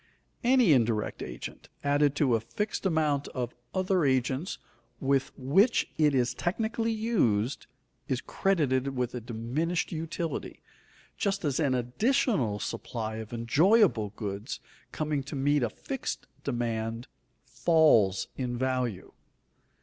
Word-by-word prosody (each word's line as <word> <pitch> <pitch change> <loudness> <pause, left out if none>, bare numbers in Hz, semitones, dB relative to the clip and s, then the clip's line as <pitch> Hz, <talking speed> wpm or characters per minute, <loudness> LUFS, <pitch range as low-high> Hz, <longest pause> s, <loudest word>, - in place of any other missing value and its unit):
Any 245 - +5
indirect 115 -4 +1
agent, - - -7
added 145 0 +3
to 140 -4 +2
a 115 - +3
fixed 205 - -2
amount 150 -5 +1
of 125 -2 -2 0.2
other 185 -2 +1
agents 130 +5 0 0.4
with 135 -1 +1
which 190 - +3
it 150 -3 +3
is 125 -1 +2
technically 225 - -1
used, 140 - +1 0.4
is 130 -2 0
credited 140 -7 0
with 125 -1 -1
a 125 - -4
diminished 125 +10 -2
utility, 165 0 -4 0.5
just 195 -3 -1
as 140 -1 0
an 140 -5 +2
additional 125 - +1
supply 110 +1 -4
of 110 -1 -7
enjoyable 140 - +3
goods, 105 +1 -4 0.3
coming 150 -2 -1
to 140 +3 -7
meet 145 +1 +2
a 120 - +1
fixed 275 +1 -5 0.2
demand, 115 -2 -2 0.4
falls 125 - +3
in 125 -2 -3
value. 125 -6 -1
135 Hz, 120 wpm, -29 LUFS, 120-170 Hz, 0.5 s, Any